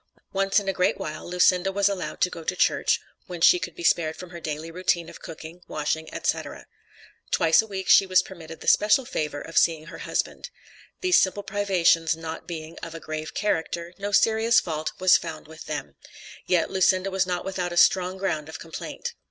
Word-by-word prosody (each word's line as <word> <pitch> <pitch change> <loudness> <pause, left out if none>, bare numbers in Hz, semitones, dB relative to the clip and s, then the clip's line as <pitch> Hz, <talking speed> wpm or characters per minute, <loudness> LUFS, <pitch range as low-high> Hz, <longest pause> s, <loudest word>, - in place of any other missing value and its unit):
Once 195 +1 +2
in 200 - -8
a 195 - +1
great 180 0 +1
while 155 +2 -6
Lucinda 180 +1 +3
was 200 0 +2
allowed 195 -3 -3
to 180 - +3
go 165 - -8
to 180 - -2
church, - - +2 0.3
when 180 -2 -7
she 360 - +6
could - - -6
be 345 - -8
spared 160 - +2
from 180 -1 -10
her 170 - -8
daily 155 0 -5
routine 170 -1 0
of - - -12
cooking, 165 +1 -10
washing, 155 +1 -3
etc. - - -3 0.6
Twice 165 +3 +4
a 220 - -10
week 190 -2 -5
she 195 - +6
was 185 0 +4
permitted 165 -3 -11
the - - -9
special 215 +6 +4
favor 150 - -3
of 165 - +1
seeing 160 -2 +1
her 165 - -10
husband. - - -3 0.5
These 365 -1 +5
simple 200 +2 0
privations 175 -6 +2
not 165 0 -7
being 165 -1 -7
of 165 -1 -8
a - - -6
grave 155 -1 -6
character, 170 -3 -2
no 200 +1 -3
serious 225 +3 +4
fault 155 -2 -3
was 185 0 +6
found 155 -4 -8
with 160 +1 -11
them; - - -5 0.5
yet 175 -3 +2
Lucinda 190 0 +2
was 190 0 +1
not 180 -1 -2
without 185 -2 -3
a 175 - -5
strong 185 +1 +4
ground 160 -6 -2
of 160 - -7
complaint. 470 - -7
180 Hz, 200 wpm, -25 LUFS, 165-195 Hz, 0.6 s, she